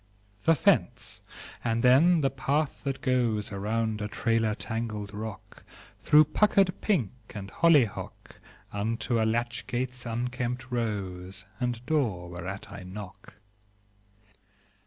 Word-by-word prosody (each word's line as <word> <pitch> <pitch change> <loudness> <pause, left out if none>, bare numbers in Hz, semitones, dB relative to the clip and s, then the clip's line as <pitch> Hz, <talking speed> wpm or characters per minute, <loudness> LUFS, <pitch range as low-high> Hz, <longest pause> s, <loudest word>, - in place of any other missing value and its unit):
The 165 - +6
fence; - - +1 0.4
and 115 -1 0
then 155 +7 +6
the 135 -2 +2
path 140 +2 -1
that 135 -1 -2
goes 120 -7 +1
Around 110 +2 -1
a 105 - -1
trailer 115 0 +1
tangled 110 -3 -4
rock, 105 -1 -8 0.4
Through 150 0 +6
puckered 195 +3 +3
pink 170 - +1 0.2
and 100 -1 -6
hollyhock, 150 - +2 0.3
Unto 115 +3 0
a - - +3
latch 120 +1 -2
gate's 125 0 -3
unkempt 125 +2 -3
rose, 95 -5 -3
And 120 -1 -2
door 110 - 0
whereat 90 +3 -6
I 100 - -8
knock. 95 +1 -10
115 Hz, 115 wpm, -28 LUFS, 105-130 Hz, 0.4 s, The